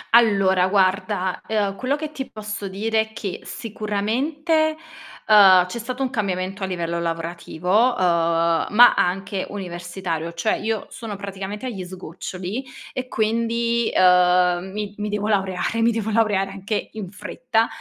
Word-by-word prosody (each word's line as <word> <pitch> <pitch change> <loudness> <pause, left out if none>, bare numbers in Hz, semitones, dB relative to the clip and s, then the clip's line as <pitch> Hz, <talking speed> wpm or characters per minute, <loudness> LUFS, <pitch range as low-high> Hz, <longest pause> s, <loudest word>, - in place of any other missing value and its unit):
Allora 195 -5 +4
guarda, 190 -1 +1
ehm, 205 -3 0
quello 260 +6 -1
che 305 0 -5
ti 265 -3 -6
posso 210 -1 -6
dire 220 +4 -1
è 220 0 -1
che 200 -4 -5
sicuramente, 270 - -1 0.5
uhm, 190 -4 +8
c'è 180 +6 -6
stato 255 +3 -4
un 255 - -2
cambiamento 195 -4 -2
a 190 - -1
livello 170 -2 -2
lavorativo, 170 +1 -4 0.2
uhm, 170 -2 +2
ma 240 +3 +7
anche 195 +2 0
universitario, 175 -3 -5
cioè 170 +6 0
io 220 0 -2
sono 220 -3 -6
praticamente 200 +3 -6
agli 205 -7 -4
sgoccioli, 185 +4 -6 0.3
e 255 0 -4
quindi, 230 +1 0
ehm, 180 0 +4
mi 205 0 -4
mi 210 0 -3
devo 210 0 -2
laureare, 195 +2 0
mi 235 - +4
devo 220 -1 -2
laureare 205 -3 +1
anche 200 +2 -3
in 205 -5 -7
fretta. 225 +3 -1
200 Hz, 140 wpm, -22 LUFS, 185-225 Hz, 0.5 s, uhm